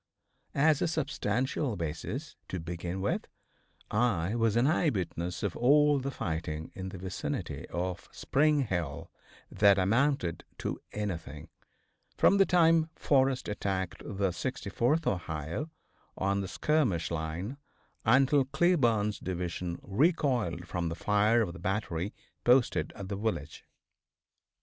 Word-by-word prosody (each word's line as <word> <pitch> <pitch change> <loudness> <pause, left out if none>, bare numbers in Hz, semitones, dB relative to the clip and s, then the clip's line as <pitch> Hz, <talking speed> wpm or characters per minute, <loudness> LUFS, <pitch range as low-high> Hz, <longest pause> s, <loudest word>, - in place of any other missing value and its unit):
As 150 +1 +4
a - - +2
substantial 135 -5 -1
basis, 90 - -4
to 95 - -4
begin 85 +2 -4
with, 100 - -1 0.6
I 105 -5 +1
was 115 -2 +2
an 120 +2 +4
eye 155 +2 +3
witness 90 - -3
of 100 -4 -1
all 145 +3 +5
the 135 +1 -3
fighting 80 - -4
in 95 0 -5
the 95 - -8
vicinity 95 +1 -4
of 90 0 -4
Spring 150 +1 +2
Hill, 85 - -3 0.4
that 100 -1 +5
amounted 110 - +1
to - - -3
anything, 80 -7 -5 0.7
from 200 - +5
the 195 - +6
time 165 -2 +4
Forrest 135 -2 +2
attacked 95 -3 -2
the 100 -1 -1
64th 125 - -1
Ohio 85 - -2 0.5
on 100 +1 +1
the 95 - -4
skirmish 125 - +1
line 85 - -3 0.5
until 135 +4 +4
Cleburne's 120 - +2
Division 90 -1 -3
recoiled 120 - +1
from 85 -2 -2
the 80 - -4
fire 105 +5 +3
of 85 -5 -4
the 95 - -10
battery 95 -1 -2 0.3
posted 125 0 +3
at 100 - -7
the 100 - -3
village. 95 -9 -3
100 Hz, 125 wpm, -30 LUFS, 90-135 Hz, 0.7 s, the